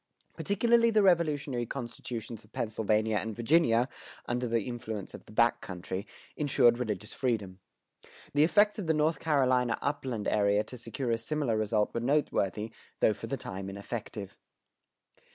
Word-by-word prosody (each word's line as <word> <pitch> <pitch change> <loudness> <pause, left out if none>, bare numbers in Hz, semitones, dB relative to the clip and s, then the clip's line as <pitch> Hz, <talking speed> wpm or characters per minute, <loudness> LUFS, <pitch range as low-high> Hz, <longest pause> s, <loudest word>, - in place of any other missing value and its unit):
Particularly 230 +3 +3
the 215 -2 +4
Revolutionary 150 -9 +2
constitutions 120 -3 -6
of 105 - -22
Pennsylvania 110 -1 0
and 110 0 -3
Virginia, 120 -1 +3 0.4
under 120 +1 -1
the 115 -2 +1
influence 110 -4 -5
of - - -11
the - - -13
back 115 +2 +3
country, 95 +2 -5 0.3
insured 120 -5 +4
religious 105 -3 -3
freedom. 105 -8 -2 0.7
The 145 +1 +5
effects 210 +6 +4
of 190 - -4
the 160 - +3
North 155 +2 +2
Carolina 130 -5 +2
upland 135 -7 -2
area 105 0 +3
to 125 - -10
secure 120 +1 -3
a 115 - +1
similar 140 -1 -1
result 110 -1 +1
were - - -1
noteworthy, 115 - 0 0.3
though - - +4
for - - -7
the - - -2
time 95 +1 -6
ineffective. 100 0 -6
120 Hz, 150 wpm, -30 LUFS, 110-145 Hz, 0.7 s, The